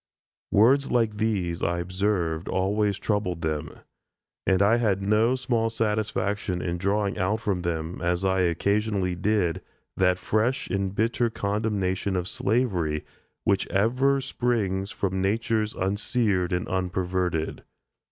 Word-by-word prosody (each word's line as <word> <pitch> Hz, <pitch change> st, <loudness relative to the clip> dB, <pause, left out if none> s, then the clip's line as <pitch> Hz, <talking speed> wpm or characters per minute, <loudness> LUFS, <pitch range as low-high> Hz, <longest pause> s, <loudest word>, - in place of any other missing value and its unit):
Words 130 Hz, +7 st, +4 dB
like 115 Hz, -3 st, +1 dB
these, 100 Hz, -6 st, -1 dB
I 85 Hz, -, 0 dB
observed, 90 Hz, -2 st, -1 dB
always 100 Hz, +1 st, +1 dB
troubled 90 Hz, -7 st, -1 dB
them; 80 Hz, 0 st, -3 dB, 0.7 s
and 95 Hz, -1 st, +4 dB
I 105 Hz, +4 st, +4 dB
had 105 Hz, -5 st, +1 dB
no 110 Hz, +5 st, +2 dB
small 120 Hz, -3 st, 0 dB
satisfaction 105 Hz, -4 st, -1 dB
in 85 Hz, -1 st, -3 dB
drawing 100 Hz, +1 st, 0 dB
out 100 Hz, +4 st, +1 dB
from 100 Hz, -5 st, -1 dB
them, 85 Hz, 0 st, -3 dB
as 90 Hz, +2 st, 0 dB
I 95 Hz, 0 st, +2 dB
occasionally 95 Hz, +2 st, +1 dB
did, 90 Hz, -2 st, 0 dB, 0.4 s
that 90 Hz, -1 st, +3 dB
fresh 110 Hz, +7 st, 0 dB
and 95 Hz, 0 st, -1 dB
bitter 115 Hz, +2 st, +1 dB
condemnation 100 Hz, -3 st, -1 dB
of 90 Hz, -1 st, -1 dB
slavery 95 Hz, -10 st, 0 dB, 0.4 s
which 100 Hz, -1 st, +1 dB
ever 130 Hz, +7 st, +2 dB
springs 105 Hz, -7 st, -1 dB
from 95 Hz, -2 st, -2 dB
natures 110 Hz, +2 st, 0 dB
unseared 100 Hz, -1 st, 0 dB
and 90 Hz, -1 st, -1 dB
unperverted. 90 Hz, -3 st, -1 dB
100 Hz, 125 wpm, -26 LUFS, 90-110 Hz, 0.7 s, Words